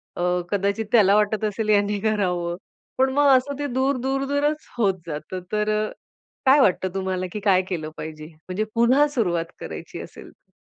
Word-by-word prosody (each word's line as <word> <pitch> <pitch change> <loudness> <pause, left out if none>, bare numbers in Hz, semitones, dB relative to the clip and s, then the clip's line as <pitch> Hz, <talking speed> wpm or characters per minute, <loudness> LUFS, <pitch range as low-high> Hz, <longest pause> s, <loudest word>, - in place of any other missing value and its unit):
अ, - - -4 0.3
कदाचित 200 +2 0
त्याला 205 -4 +5
वाटत 210 0 +1
असेल 215 +1 -2
ह्याने 205 -1 +2
करावं, 180 -5 0 0.4
पण 265 +1 +3
मग 290 +1 +4
असं 280 +2 -3
ते 290 - -1
दूर-दूरच 275 +3 0
होत 205 -5 +3
जातं. 155 +4 -5
तर 210 0 0 0.2
अ, - - -7 0.6
काय 270 +2 +6
वाटतं 185 -6 +2
तुम्हाला 190 -1 -2
की 210 - -4
काय 195 -2 +3
केलं 160 -4 -3
पाहिजे, 155 -1 -7 0.2
म्हणजे 190 +4 -1
पुन्हा 255 +6 +4
सुरुवात 175 -8 0
करायची - - -7
असेल - - -11
तर? - - -35
210 Hz, 165 wpm, -23 LUFS, 185-260 Hz, 0.6 s, काय